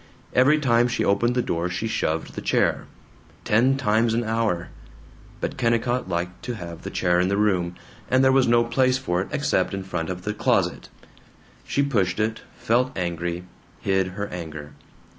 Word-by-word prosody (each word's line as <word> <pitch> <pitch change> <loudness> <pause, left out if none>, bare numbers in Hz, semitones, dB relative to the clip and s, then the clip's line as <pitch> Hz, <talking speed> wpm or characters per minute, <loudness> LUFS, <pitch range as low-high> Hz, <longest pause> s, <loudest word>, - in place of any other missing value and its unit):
Every 135 +5 +5
time 120 -5 +3
she 125 +1 -1
opened 120 +5 +2
the 125 - +1
door 85 -2 -1
she 90 +5 -3
shoved 80 -7 -2
the - - -6
chair. - - +1 0.6
Ten 125 +5 +3
times 115 -2 +2
an 120 - +1
hour. 110 -6 -1 0.7
But - - -3
Kennicott 120 -2 0
liked 90 +1 -3
to 125 - -3
have 85 -4 -8
the - - -6
chair 90 0 +1
in 90 - +2
the 100 +1 0
room, 90 -4 +1 0.3
and 130 +1 +4
there 130 - +5
was 130 -1 +4
no 120 0 +4
place 130 +2 +2
for 90 -9 -1
it - - -4
except - - 0
in 95 - -4
front 90 -3 -3
of 90 0 -5
the 105 - -2
closet. - - 0 0.8
She 140 - +1
pushed 100 -9 0
it, 110 +1 -1 0.2
felt 125 +2 +1
angry, 85 0 -2 0.4
hid 95 -1 +1
her 100 - -2
anger. 75 -4 -7
105 Hz, 180 wpm, -24 LUFS, 90-120 Hz, 0.8 s, Every